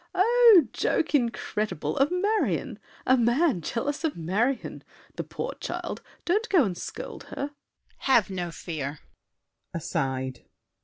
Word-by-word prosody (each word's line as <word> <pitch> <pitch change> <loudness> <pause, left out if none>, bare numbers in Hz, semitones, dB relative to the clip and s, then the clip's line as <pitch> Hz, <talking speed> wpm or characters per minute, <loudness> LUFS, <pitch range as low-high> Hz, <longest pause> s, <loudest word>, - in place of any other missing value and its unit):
Oh, 450 - +7
joke 320 - 0
incredible!—of 230 - 0
Marion! 325 - 0 0.3
A 260 - +5
man 245 - +2
jealous 280 - -2
of 320 -3 -1
Marion! 210 +11 -1 0.3
The - - -3
poor - - -5
child! - - -4 0.2
Don't 425 +7 +1
go 355 -7 +5
and 190 -6 -1
scold - - -7
her! 280 - -4
DIDIER. - - -34 0.4
Have 235 -8 +3
no 180 -2 -3
fear. 150 -4 -5 0.8
[Aside. 130 -5 -2
240 Hz, 120 wpm, -27 LUFS, -, 0.8 s, Oh